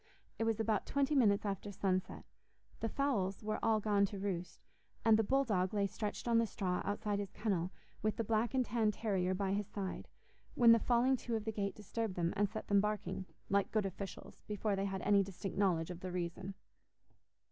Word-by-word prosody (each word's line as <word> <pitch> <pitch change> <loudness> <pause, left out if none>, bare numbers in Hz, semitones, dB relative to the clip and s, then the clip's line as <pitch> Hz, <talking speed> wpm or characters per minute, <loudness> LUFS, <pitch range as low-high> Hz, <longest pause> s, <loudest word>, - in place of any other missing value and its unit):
It 225 - +1
was 225 -1 +1
about 220 -2 0
twenty 280 +1 +1
minutes 215 -7 +4
after 200 0 -3
sunset. 185 -1 -1 0.5
The 225 - -1
fowls 215 -10 0
were 215 0 -1
all 220 -1 +3
gone 205 -1 +2
to 200 - -7
roost, 190 -3 -4 0.4
and 225 -1 +7
the 220 - +3
bull 270 +6 +3
dog 195 -4 0
lay 200 -1 +2
stretched 210 +3 -4
on 230 -1 +4
the 230 - +2
straw 185 -3 -1
outside 205 0 -1
his 200 -1 -3
kennel, 185 -5 -1 0.3
with 215 0 0
the 230 - -1
black 225 +3 +1
and 255 -1 +3
tan 225 -1 +1
terrier 190 -4 0
by 195 0 0
his 205 -1 -1
side, 195 -2 -5 0.5
when 235 -2 +7
the 230 - +7
falling 250 +3 +3
to 235 -1 -3
of 220 -1 -3
the 220 - -1
gate 200 -2 -2
disturbed 215 -1 -3
them 170 -1 0
and 205 0 +2
set 220 +1 -6
them 200 -1 +4
barking, 210 -2 -2 0.2
like 200 0 +1
good 215 -2 +1
officials, 195 0 -7
before 210 0 0
they 195 0 -1
had 190 -2 -3
any 200 0 +5
distinct 195 0 -5
knowledge 180 -4 +1
of 175 - -7
the 185 0 -5
reason. 180 +2 -4
205 Hz, 205 wpm, -35 LUFS, 190-225 Hz, 0.5 s, and